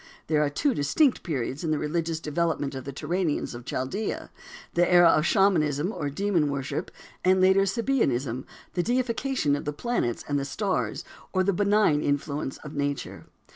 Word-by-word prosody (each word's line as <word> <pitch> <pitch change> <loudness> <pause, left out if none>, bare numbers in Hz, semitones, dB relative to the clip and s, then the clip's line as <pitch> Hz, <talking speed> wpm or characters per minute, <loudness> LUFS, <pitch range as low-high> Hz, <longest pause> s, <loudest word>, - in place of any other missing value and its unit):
There 150 -1 +2
are 145 - +1
two 275 - +1
distinct 240 - +2
periods 135 -2 -3
in 165 - -1
the 155 - +1
religious 160 +2 -1
development 155 -2 -1
of 130 -1 -6
the 140 - -4
Turanians 160 +2 -2
of 120 0 -9
Chaldea, 185 +12 -3 0.4
the 175 +1 +2
era 175 -1 +7
of 155 0 +3
Shamanism 170 -4 +2
or 145 -9 -3
demon 170 -1 +1
worship, 140 -1 -3 0.3
and 185 +1 +4
later 190 +1 +4
Sabeanism, 140 - 0 0.3
the 180 - +1
deification 245 - 0
of 145 - -5
the 150 - -2
planets 150 - -2
and 145 -1 0
the - - -2
stars 190 +7 -2 0.3
or 185 -1 +3
the 200 +1 +2
benign 205 -5 +3
influence 145 -1 -2
of 150 - -8
nature. 145 -1 -3
160 Hz, 170 wpm, -26 LUFS, 145-195 Hz, 0.4 s, era